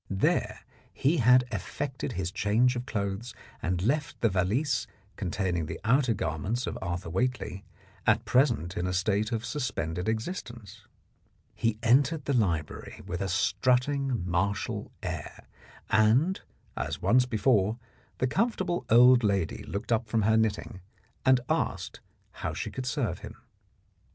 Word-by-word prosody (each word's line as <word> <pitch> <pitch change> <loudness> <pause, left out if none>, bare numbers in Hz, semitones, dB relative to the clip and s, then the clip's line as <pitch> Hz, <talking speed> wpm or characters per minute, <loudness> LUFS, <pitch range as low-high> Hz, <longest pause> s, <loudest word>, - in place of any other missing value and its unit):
There 95 -1 0 0.3
he 150 +6 +1
had 125 0 +6
effected 125 +6 -4
his 90 -2 -2
change 110 +6 +2
of 120 +1 -4
clothes 100 +2 -3 0.3
and 90 +1 -1
left 145 +6 0
the 115 - +3
valise 110 +9 0 0.3
containing 90 -4 -2
the - - -5
outer 125 +1 +3
garments 100 - -2
of - - -4
Arthur 90 -2 -4
Whately, 120 -2 -2 0.4
at - - +3
present 120 - +2
in 90 +1 -1
a 90 - -1
state 105 +4 +1
of 115 0 -2
suspended 100 - -2
existence. 115 - -5 0.7
He 115 -2 0
entered 135 +5 +3
the 140 - 0
library 85 - -1
with 90 +2 -4
a 95 - -1
strutting 125 +2 +1
martial 95 +3 -1
air, - - -6 0.5
and, 115 - +3 0.3
as - - -3
once 125 +1 +3
before, 110 -2 +2 0.4
the - - +1
comfortable 180 - 0
old 125 +1 +7
lady 100 -5 0
looked 100 +5 -5
up 115 0 +1
from 110 0 +1
her 110 +2 +4
knitting 110 -3 -1 0.5
and 130 -1 +6
asked - - -2 0.4
how - - -2
she - - -4
could 130 -1 -5
serve 125 - -1
him. - - -9
110 Hz, 140 wpm, -28 LUFS, 95-125 Hz, 0.7 s, old